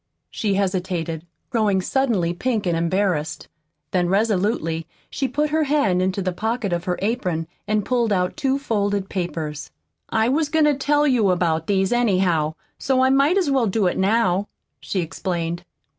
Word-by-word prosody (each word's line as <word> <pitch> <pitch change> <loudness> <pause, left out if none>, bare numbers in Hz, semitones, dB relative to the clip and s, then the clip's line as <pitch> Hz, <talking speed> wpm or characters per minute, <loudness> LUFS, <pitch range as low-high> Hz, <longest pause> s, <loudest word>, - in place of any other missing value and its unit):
She 205 -3 -1
hesitated, 180 -4 -2 0.2
growing 215 -5 +2
suddenly 195 -5 0
pink 220 +2 -1
and 175 -2 +1
embarrassed. 170 -2 -1 0.4
Then 175 -2 +1
resolutely 195 -5 0 0.2
she 270 - -1
put 295 +2 -1
her 310 0 +2
hand 270 -11 +2
into 190 +1 0
the 185 -1 -1
pocket 220 0 -2
of 170 0 -2
her 180 -1 -1
apron 185 -7 -1 0.2
and 210 -1 0
pulled 240 -3 +1
out 180 -2 +1
two 270 -1 0
folded 205 -7 -1
papers. 160 -5 -4 0.4
"I 220 0 +2
was 295 +4 +1
goin' 315 0 +3
to 300 - +4
tell 290 +2 +2
you 245 -8 +3
about 165 -3 +1
these, 195 -1 +1
anyhow, 185 -9 +2 0.2
so 265 -1 +1
I 260 - +4
might 280 +7 +4
as 350 -8 +1
well 260 -4 +2
do 205 +1 +1
it 180 - +1
now," 195 -1 +2 0.3
she 190 - -2
explained. 170 0 -3
200 Hz, 165 wpm, -22 LUFS, 175-245 Hz, 0.4 s, to